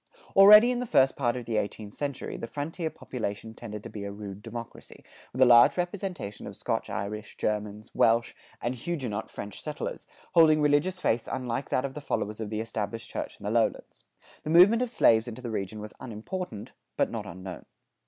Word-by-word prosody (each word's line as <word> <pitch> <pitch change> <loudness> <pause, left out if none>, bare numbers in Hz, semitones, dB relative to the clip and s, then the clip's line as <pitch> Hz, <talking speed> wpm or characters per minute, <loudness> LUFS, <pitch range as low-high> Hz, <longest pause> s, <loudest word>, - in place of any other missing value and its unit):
Already 210 +4 +9
in 245 - -1
the 250 - -3
first 135 -9 +4
part 120 -3 0
of 120 - -6
the 110 -1 -1
eighteenth 105 0 -3
century, 140 -2 -4
the 115 - -5
frontier 160 +5 -4
population 110 -7 -5
tended 105 -2 -8
to 115 - -7
be 105 -2 -7
a 100 - -4
rude 100 -1 -8
democracy, 115 +1 -9 0.3
with 130 +1 +3
a - - +7
large 120 +4 +7
representation 180 - -4
of - - -8
Scotch - - -2
Irish, 105 +2 -5
Germans, 105 0 -3
Welsh, 115 +1 +3 0.3
and 120 - 0
Huguenot 125 -6 -4
French 100 -1 -8
settlers, 150 -1 -5 0.3
holding 160 -2 +6
religious 150 +5 +2
faiths 115 -9 0
unlike 130 0 -3
that 130 - +1
of 135 - -4
the 150 - -7
followers 105 -6 -2
of 110 - -4
the 110 0 -2
established 115 0 -4
church - - -5
in - - -14
the - - -2
lowlands. - - -1 0.4
The - - -6
movement 185 +8 +7
of 250 - 0
slaves 115 - +4
into 120 +2 -8
the 120 - -4
region 105 0 -4
was 105 0 -8
unimportant, 115 - -6 0.3
but - - +1
not - - -5
unknown. 95 +1 -8
120 Hz, 190 wpm, -28 LUFS, 105-150 Hz, 0.4 s, Already